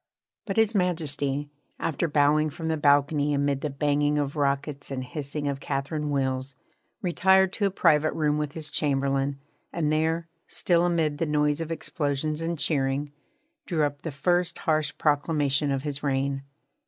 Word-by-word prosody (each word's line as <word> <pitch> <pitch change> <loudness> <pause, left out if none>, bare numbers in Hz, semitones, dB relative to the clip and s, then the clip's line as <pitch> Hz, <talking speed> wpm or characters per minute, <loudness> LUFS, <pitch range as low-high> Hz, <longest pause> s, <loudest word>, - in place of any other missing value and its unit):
But 195 - -3
His 225 0 +3
Majesty, 145 -6 0 0.3
after 165 +2 -1
bowing 150 +1 +3
from 160 +2 -5
the 160 - +1
balcony 145 0 +3
amid 140 -1 0
the 150 - -1
banging 145 +1 +1
of 145 0 -1
rockets 140 0 -1
and 130 -2 -3
hissing 145 +3 -4
of 140 -1 -2
Catherine 150 +3 -2
wheels, 130 -1 -1 0.5
retired 190 +1 +4
to 205 - +1
a - - 0
private 155 -4 +3
room 150 -1 +1
with 150 -1 -3
his 155 -2 -5
Chamberlain, 140 -1 0 0.3
and 155 -3 0
there, 160 +2 0 0.2
still 175 -1 +2
amid 160 -4 0
the 165 - 0
noise 150 +1 +1
of 165 0 -4
explosions 150 -1 -2
and 165 +1 -2
cheering, 140 -1 0 0.6
drew 165 -4 +1
up 145 -1 -2
the 165 - -4
first 175 +4 +1
harsh 155 -2 0
proclamation 145 -1 +1
of 135 -1 -1
his 145 -1 -3
reign. 135 -1 0
150 Hz, 160 wpm, -26 LUFS, 140-160 Hz, 0.6 s, retired